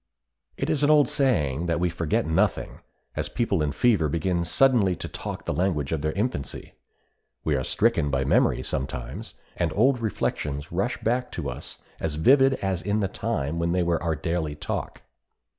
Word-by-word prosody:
It - - -2
is 150 - 0
an 145 - +3
old 150 -3 +6
saying 85 - +1
that 85 0 0
we 90 - +2
forget 85 -3 0
nothing, 80 +1 0 0.4
as - - -2
people 105 -8 0
in 75 -1 0
fever 100 -6 +2
begin 85 +3 0
suddenly 105 -1 +3
to - - -6
talk - - -6
the - - -1
language 80 -4 0
of 80 -3 -1
their 75 +1 0
infancy. 100 - -3 0.7
We 75 - +1
are 65 - 0
stricken 75 - +1
by 70 - 0
memory - - +2
sometimes, 70 0 -4 0.2
and 85 -2 0
old 125 +4 +3
reflections 75 -9 -2
rush 100 +8 -1
back 125 +2 0
to - - -3
us - - -8 0.2
as 80 -2 -2
vivid 135 - +5
as 95 -2 0
in 105 +2 0
the 100 - +1
time 75 -3 -2
when 85 0 0
they 90 -1 +2
were 85 -1 0
our 85 -2 0
daily 80 -1 -2
talk. 75 +1 -5
85 Hz, 180 wpm, -25 LUFS, 75-115 Hz, 0.7 s, old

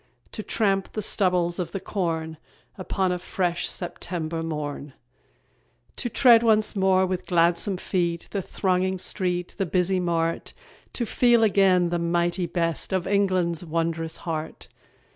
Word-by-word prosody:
To 215 - -5
tramp 195 -3 0
the 215 - -3
stubbles 180 -4 +1
of 180 - -4
the 195 - -2
corn 165 -5 -3 0.4
Upon 185 0 -1
a 180 - -2
fresh 175 -1 -1
September 170 -2 -5
morn; 150 -3 -5 1.0
To 240 - -2
tread 235 -1 +6
once 215 -2 +3
more 190 -1 +3
with 185 -1 -3
gladsome 175 +2 +2
feet 170 -2 -2
The 200 - -2
thronging 185 0 0
street, 180 -1 -2
the 195 - 0
busy 185 +2 +1
mart; 165 -2 -1 0.4
To 240 - -2
feel 240 0 +3
again 190 -4 +4
the 175 0 -1
mighty 175 +1 0
beat 165 -2 -1
Of 185 -2 0
England's 185 -4 +1
wondrous 165 0 -2
heart! 160 -2 -5
180 Hz, 140 wpm, -25 LUFS, 170-195 Hz, 1.0 s, tread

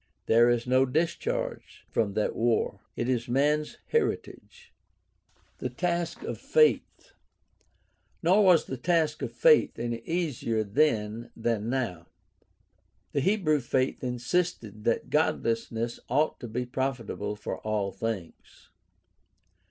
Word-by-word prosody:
There 120 +2 +5
is 120 -1 +1
no 130 +1 +3
discharge 165 +6 -2
from 105 -3 0
that 105 - 0
war. 115 0 +1 0.2
It - - -2
is 125 -1 0
man's 150 +4 +1
heritage. 470 +1 -2 0.9
The - - -2
task 175 -1 -2
of - - -5
faith. 465 -1 +2 0.5
— - - -42
Nor 190 +5 +5
was 180 -4 +5
the 130 - -5
task 160 +2 +1
of - - -3
faith 480 -2 +4
any 120 0 -3
easier 135 -7 -1
then 110 -1 0
than 115 -1 -1
now. 115 -11 -2 1.0
The 145 - 0
Hebrew 170 -4 +2
faith 130 +1 -1
insisted 125 - -2
that 115 - 0
godliness 115 -5 0
ought 145 +5 +1
to 120 - -6
be 125 +3 -3
profitable 120 -5 -3
for 105 - -5
all 105 -2 -1
things. 110 -7 -6
125 Hz, 120 wpm, -28 LUFS, 115-155 Hz, 1.0 s, There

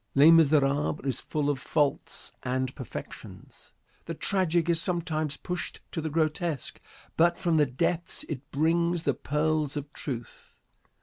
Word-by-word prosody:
"Les 145 +4 +8
Miserables" 150 -2 +3
is 130 -3 -1
full 150 -2 -2
of 145 -2 0
faults 145 +1 -1
and 130 0 -1
perfections. 130 -5 -9 0.3
The - - -4
tragic 175 -4 +1
is 170 -1 +3
sometimes 160 -5 -1
pushed 180 -2 -4
to 160 - -3
the 160 - -2
grotesque, 155 -1 -1 0.3
but 170 +1 +4
from 170 -3 +1
the 150 -2 +4
depths 165 +6 -1
it 145 -2 -6
brings 170 +3 +1
the 140 - +2
pearls 150 +2 0
of 145 0 -6
truth. 120 -5 -7
155 Hz, 140 wpm, -28 LUFS, 140-165 Hz, 0.3 s, Les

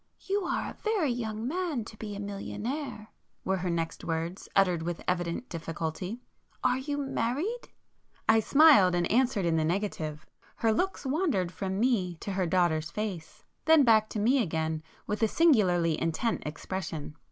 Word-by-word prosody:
"You 395 -1 -1
are - - -1
a - - -14
very 415 - +1
young 225 -1 -3
man 320 - -2
to 215 - -10
be 210 -1 -6
a - - -6
millionaire,"—were 210 0 -5
her 180 0 -2
next 165 -1 -2
words, 165 +3 -3
uttered 180 -4 +3
with 170 +1 -4
evident 175 +5 -1
difficulty—"Are 180 +10 -4
you 285 +2 -3
married?" 285 - -2 0.6
I 220 0 +6
smiled, 270 - +6
and 175 0 +1
answered 240 -4 +2
in 165 -1 +2
the 160 - +2
negative. 160 -4 -2 0.3
Her 225 -1 +2
looks 370 +6 -1
wandered 265 - 0
from 190 0 -3
me 210 -8 +1
to 200 - -6
her 185 -2 0
daughter's 165 -3 +1
face,—then 215 - 0
back 220 -3 +4
to 215 - -3
me 250 +6 +3
again 160 -4 -1 0.2
with 210 +2 -3
a 220 - +5
singularly 185 - +3
intent 165 +8 0
expression. 160 -1 -5
205 Hz, 150 wpm, -29 LUFS, 170-255 Hz, 0.6 s, I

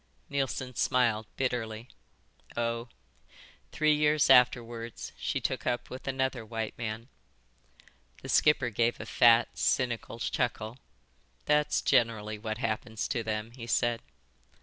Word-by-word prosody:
Neilson 135 -2 -2
smiled 115 -3 +1
bitterly. 120 -3 -2 0.7
"Oh, 115 0 -1 0.8
three 155 -1 +3
years 150 -1 +3
afterwards 120 -2 +2
she - - -2
took - - -3
up 120 -1 -2
with 130 - -8
another 130 -2 -1
white 110 0 -4
man." 115 0 -5 1.2
The - - -7
skipper 145 -5 +3
gave 115 +3 +1
a - - -6
fat, 115 -1 +4
cynical 120 -3 0
chuckle. 115 0 -2 0.7
"That's 150 0 +2
generally 110 -3 +1
what 110 0 -4
happens 110 -1 -2
to 125 - 0
them," 110 0 -3
he 115 -1 -9
said. 120 0 +1
120 Hz, 120 wpm, -29 LUFS, 115-130 Hz, 1.2 s, fat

